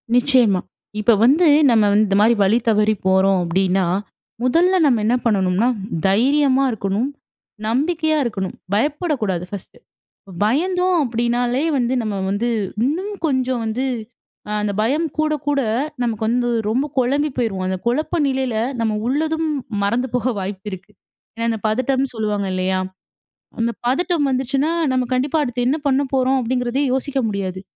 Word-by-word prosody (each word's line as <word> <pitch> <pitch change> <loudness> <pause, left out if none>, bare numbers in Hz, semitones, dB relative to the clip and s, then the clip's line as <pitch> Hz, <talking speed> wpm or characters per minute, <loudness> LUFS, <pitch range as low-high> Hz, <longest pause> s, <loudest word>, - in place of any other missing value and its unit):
நிச்சயமா. 245 -7 +4 0.4
இப்ப 230 +2 +4
வந்து 310 +7 +4 0.2
நம்ம 225 -2 +4
வந்து 215 +1 +4
இந்த 195 - +1
மாதிரி 230 +2 +4
வழி 200 +4 +3
தவறி 215 0 +3
போறோம் 190 0 +3
அப்படின்னா, 185 +2 +1 0.6
முதல்ல 340 +9 +3
நம்ம 250 -6 +3
என்ன 235 +3 +3
பண்ணணும்னா 195 0 +2 0.4
தைரியமா 265 +6 +3
இருக்கணும். 210 +3 -1 0.6
நம்பிக்கையா 310 +6 +1
இருக்கணும். 200 -6 -3 0.2
பயப்படக்கூடாது 240 - -1
ஃபர்ஸ்ட்டு. 200 -2 -9 0.7
பயந்தோம் 360 - +1
அப்படினாலே 240 +2 0
வந்து 245 -1 0
நம்ம 215 -2 -3 0.2
வந்து, 205 +5 -1 0.4
இன்னும் 370 +9 -2
கொஞ்சம் 260 -4 0
வந்து 230 +4 -2 0.6
அ - - -5
அந்த 210 -1 -1
பயம் 285 +10 +1
கூட 310 0 +1
கூட 290 -1 +1 0.4
நமக்கு 225 -3 -2
வந்து 240 +2 +1 0.2
ரொம்ப 250 +7 0
குழம்பி 280 +4 +1
போயிருவோம். 215 -7 -1
அந்த 185 0 -1
குழப்ப 300 +8 0
நிலையில 265 -3 -1 0.3
நம்ம 225 -1 0
உள்ளதும், 315 +4 0 0.3
மறந்து 235 +6 0
போக 250 +1 +1
வாய்ப்பு 195 +1 -6
இருக்கு. 190 +2 -9 0.4
ஏன்னா 230 - -3
அந்த 225 -1 -1
பதட்டம்னு 260 +5 0
சொல்லுவாங்க 210 -3 -2
இல்லையா? 185 0 0 0.8
அந்த 230 +1 +1
பதட்டம் 295 +4 +1
வந்துருச்சுன்னா, 270 +4 0 0.2
நம்ம 255 -1 0
கண்டிப்பா 265 +5 0
அடுத்து 245 -2 -2
என்ன 280 +5 +1
பண்ண 270 0 +2
போறோம் 265 0 +2
அப்படிங்கிறதே 250 +2 -1
யோசிக்க 270 +1 -1
முடியாது. 190 -2 -4
245 Hz, 140 wpm, -20 LUFS, 210-275 Hz, 0.8 s, நிச்சயமா